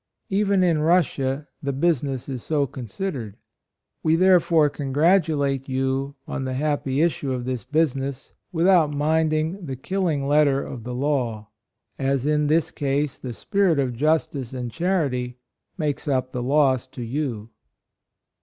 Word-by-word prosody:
Even 200 -1 +2
in 170 -4 +3
Russia 150 -4 +1
the 140 -2 -1
business 140 -3 0
is 130 -3 -4
so 145 +1 0
considered. 125 - -5 0.6
We, 160 +1 +3
therefore, 170 -3 +4
congratulate 145 -1 +1
you 135 +1 -1
on 135 - -3
the 130 -1 -3
happy 145 -1 0
issue 150 -5 0
of 125 -1 -3
this 130 -2 -3
business, 140 -3 -1 0.2
with 170 -1 +1
out 180 -5 +5
minding 155 +4 0
the 135 -5 -4
killing 155 -1 -1
letter 145 -2 +3
of 120 -4 -8
the 125 0 -4
law; 125 -6 -1 0.5
as 135 -1 0
in 150 0 +2
this 155 +1 +2
case 145 -1 -1
the 125 - -6
spirit 195 - +1
of 130 -3 0
justice 145 -2 0
and 125 -2 -4
charity 135 -8 -1 0.4
makes 150 -3 -2
up 130 -2 0
the 125 - -3
loss 130 -1 +2
to 130 -1 -8
you." 115 -3 -3
140 Hz, 145 wpm, -23 LUFS, 130-160 Hz, 0.6 s, out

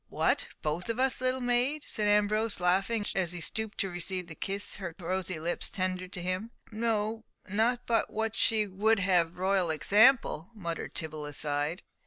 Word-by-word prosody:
"What, - - +1 0.2
both 165 +6 -2
of 230 +2 -1
us, 265 -1 +2
little 255 0 +1
maid?" 250 +5 +1
said 210 -1 -1
Ambrose, 210 +1 +2
laughing, 195 +5 +2
as 180 -3 0
he 175 - -5
stooped 220 +5 -3
to 195 - -1
receive 180 +1 -4
the 170 - -9
kiss 195 +5 -2
her 175 -5 -6
rosy 185 -1 -3
lips 170 +2 -1
tendered 185 -1 -2
to 180 - -5
him. 185 +5 -2 0.2
"Not 220 +1 -1
but 230 -1 +1
what 220 0 -2
she 220 -2 +2
would 210 +3 +2
have 180 -3 +2
royal 190 -1 +2
example," 205 - +4
muttered 170 -5 -5
Tibble 155 -2 -4
aside. 145 +3 -1
195 Hz, 165 wpm, -30 LUFS, 175-220 Hz, 0.2 s, example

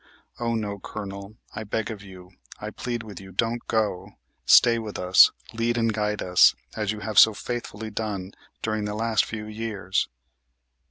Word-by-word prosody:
Oh, 115 -1 0
no, 105 -2 -3
Colonel, 100 +2 -7 0.2
I 110 - -5
beg 110 +1 -2
of 105 -3 -7
you, 95 -2 -13 0.3
I 105 +1 -6
plead 120 0 -4
with 100 -4 -9
you, 95 0 -12
don't 115 +5 -1
go! 105 -5 -1 0.3
Stay 115 -1 +7
with 110 -2 -6
us; 90 0 +7 0.2
lead 115 +1 0
and 115 -1 +1
guide 105 0 -1
us, 90 -1 +6 0.2
as 105 -2 -1
you 110 -1 -6
have 105 0 +3
so 110 -1 +7
faithfully 110 -2 -5
done 100 -3 -4 0.3
during 110 -1 -1
the 105 0 -3
last 110 0 +1
few 110 -1 -6
years!" 105 -3 -2
105 Hz, 170 wpm, -25 LUFS, 100-115 Hz, 0.3 s, Stay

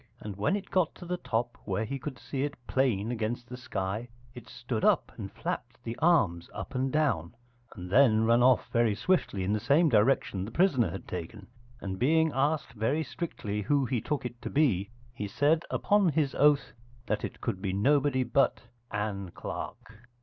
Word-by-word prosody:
And 105 -2 -7
when 105 - +1
it 200 -2 -6
got 185 -4 +1
to 180 - -10
the 180 +1 -2
top 120 -6 -2
where 100 +2 -1
he 135 +5 -4
could 135 -1 -6
see 135 - -5
it 145 0 -2
plain 120 -5 +1
against 120 +1 -3
the 125 - -7
sky, 115 -2 -4 0.2
it 125 -2 -11
stood 120 -2 -4
up - - +3
and - - -7
flapped - - -5
the 115 0 -4
arms 100 - +3
up - - -6
and 130 0 0
down, 120 - 0 0.4
and 90 - -7
then 110 -2 +5
run 115 +1 +4
off 125 -1 +4
very 115 -3 +3
swiftly 110 - 0
in 100 +3 0
the 105 - +1
same 145 +8 +4
direction 105 -4 +2
the 100 - -5
prisoner 130 - +2
had 95 +3 -7
taken: 90 +4 -6 0.4
and 95 -1 -4
being 160 +4 +3
asked 140 -2 0
very 120 +8 0
strictly 105 -12 -4
who 140 +5 +2
he 125 -3 -1
took 150 -4 -2
it 120 -1 -6
to - - -4
be, 115 - +2 0.2
he 105 -4 -4
said 150 +9 +2
upon 205 -3 +3
his 150 -3 0
oath 145 -1 +3 0.3
that 105 - -1
it - - -5
could 100 -6 -3
be 95 - -1
nobody 130 +6 +2
but 125 +3 +2 0.3
Ann 105 -2 -3
Clark. 110 +5 -7
120 Hz, 190 wpm, -29 LUFS, 105-145 Hz, 0.4 s, then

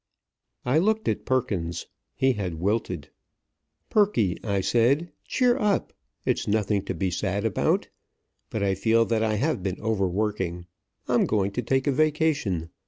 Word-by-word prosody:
I 130 +5 +3
looked 220 +4 +1
at - - -1
Perkins. 95 -10 -1 0.3
He 130 0 +3
had 95 -7 -3
wilted. 100 +7 -2 0.8
"Perky," 125 - +2
I 100 -3 0
said, 130 - +2 0.2
"cheer 250 -1 +3
up. 210 -4 +1 0.3
It's - - 0
nothing 105 -1 +1
to - - -3
be 95 +2 -1
sad 100 +3 -1
about. 110 - +1 0.6
But 110 - -2
I 100 -1 +2
feel 115 +4 +3
that 115 -1 0
I 110 -1 +1
have 140 0 0
been 95 0 -3
overworking. 95 -4 -1 0.4
I'm - - +3
going 100 -2 +1
to 125 - -2
take 130 +3 0
a 145 - +3
vacation. 145 - +1
110 Hz, 150 wpm, -26 LUFS, 95-135 Hz, 0.8 s, I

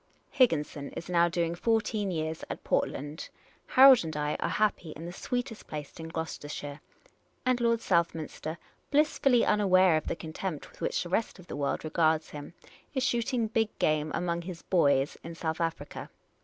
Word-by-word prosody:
" - - -39
Higginson 150 - +1
is 170 - -7
now 170 -1 +4
doing 170 0 0
fourteen 215 +1 0
years 160 -2 -3
at - - -6
Portland; 145 +3 -2 0.4
Harold 260 -3 +8
and 160 -2 -4
I 150 0 0
are - - -1
happy 210 -6 0
in 160 - -8
the 175 - -6
sweetest 245 +1 -4
place 150 +1 -7
in 160 - -6
Gloucester 160 -2 -5
shire; 145 0 -6 0.6
and 255 -1 +2
Lord 230 -1 +2
Southminster, 165 -3 -1 0.3
blissfully 280 -4 +3
unaware 185 -5 +4
of 155 - -4
the - - -1
contempt 160 0 -5
with - - -20
which - - 0
the 175 - -8
rest 220 +5 -1
of 185 - -14
the - - -7
world 140 -1 -1
regards 160 0 +1
him, 150 +4 -9 0.4
is 260 - +1
shooting 240 -2 +1
big 220 0 -1
game 155 0 +1
among 170 -1 -1
his 170 -1 -8
"boys" 140 -6 +2
in 165 0 -7
South 160 0 -3
Africa. 165 0 -4
170 Hz, 175 wpm, -29 LUFS, 155-215 Hz, 0.6 s, Harold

